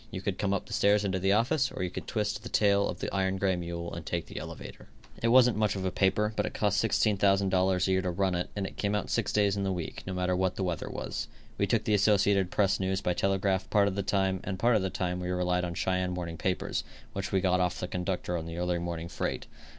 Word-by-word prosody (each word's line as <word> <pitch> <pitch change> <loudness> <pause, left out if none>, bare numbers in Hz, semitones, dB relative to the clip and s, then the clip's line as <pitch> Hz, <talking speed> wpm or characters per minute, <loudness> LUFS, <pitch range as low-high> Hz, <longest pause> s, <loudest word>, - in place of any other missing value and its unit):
You - - -5
could 95 0 -3
come 100 - 0
up 100 - -1
the - - -8
stairs 105 +1 +3
into 95 -1 0
the 95 +2 +2
office 130 +7 +2
or - - -4
you 90 - -2
could - - -7
twist 105 -2 -1
the 120 - -8
tail 100 -1 +3
of - - -5
the - - -3
iron 95 -1 0
gray 95 -1 +1
mule 85 -1 -5
and 85 - -6
take 85 0 -3
the - - -7
elevator. - - -9 0.3
It 115 - +2
wasn't 125 0 +5
much 105 -2 +1
of 95 -1 -3
a 95 - 0
paper, 105 +3 +1
but - - +1
it - - -7
cost 105 0 +1
$16,000 95 -4 +2
a - - +1
year 95 0 +3
to 95 - -2
run 95 +1 0
it, 90 0 -2
and 100 -2 -2
it - - -8
came 100 0 0
out 105 - -2
six 115 -3 0
days 100 -2 +2
in 100 - -2
the 95 -1 0
week, 90 -3 -4
no 95 - -3
matter 90 0 0
what 95 0 0
the 95 - -2
weather 85 -3 -2
was. - - -4 0.3
We - - +2
took - - +1
the 105 - +1
Associated 100 -2 +3
Press 100 0 +2
news 95 0 0
by 90 - 0
telegraph 95 0 0
part 100 -1 +4
of 100 - -1
the 100 - -1
time 95 -1 0
and 95 -2 -3
part 120 +4 +3
of 105 - +3
the 95 - -1
time 90 -1 -2
we 90 0 -4
relied 90 0 0
on 85 -1 -3
the - - -8
Cheyenne 90 -1 0
morning 85 -2 -5
papers, 95 -1 -1 0.3
which 95 0 -4
we 95 - +3
got 90 -1 +2
of 90 0 0
the 90 - -3
conductor 90 -1 -2
on 80 -1 -4
the 85 0 -6
early 90 0 0
morning 85 -1 -4
freight. - - -3
95 Hz, 270 wpm, -29 LUFS, 90-100 Hz, 0.3 s, wasn't